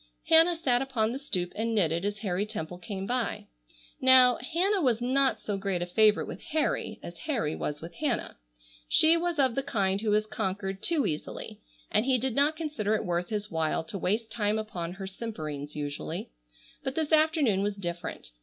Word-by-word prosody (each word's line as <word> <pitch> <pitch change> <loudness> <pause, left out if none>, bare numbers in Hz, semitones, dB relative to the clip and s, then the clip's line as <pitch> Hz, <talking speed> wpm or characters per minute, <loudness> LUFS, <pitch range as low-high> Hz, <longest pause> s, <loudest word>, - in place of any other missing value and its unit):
Hannah 330 +2 +6
sat 260 -7 +1
upon 240 -5 0
the 260 - -4
stoop 180 -11 -2
and 225 +1 -1
knitted 170 -2 +2
as 205 0 -2
Harry 195 -3 -1
Temple 180 -5 -6
came 190 +1 -5
by. 245 -2 -2 0.6
Now, 255 -2 +7
Hannah 365 - 0
was 245 -6 +2
not 265 +2 +1
so 205 -2 -3
great 195 -3 -1
a - - -2
favorite 210 +4 +4
with - - -8
Harry 310 -1 -1
as - - -9
Harry 225 - 0
was 150 0 -4
with 170 +1 -8
Hannah. 290 -7 -2 0.5
She 320 +1 +7
was 340 -1 -1
of 265 -4 +3
the 275 - 0
kind 200 -7 0
who 220 - -1
was 210 +1 +3
conquered 195 -1 -3
too 325 -4 +2
easily, 150 -1 -5 0.3
and 215 - +3
he 260 0 +3
did 255 0 -1
not 285 +5 +3
consider 240 -10 -1
it 215 - -2
worth 175 -1 -1
his 210 -1 -3
while 160 -1 0
to 165 +5 -6
waste 220 +5 -1
time 210 -2 0
upon 180 -6 -4
her 195 +1 -7
simperings 155 -9 -6
usually. 145 - -4 0.5
But 265 - -3
this 315 -1 -1
afternoon 310 - +3
was 205 0 -1
different. 170 - -6
215 Hz, 190 wpm, -28 LUFS, 185-265 Hz, 0.6 s, Now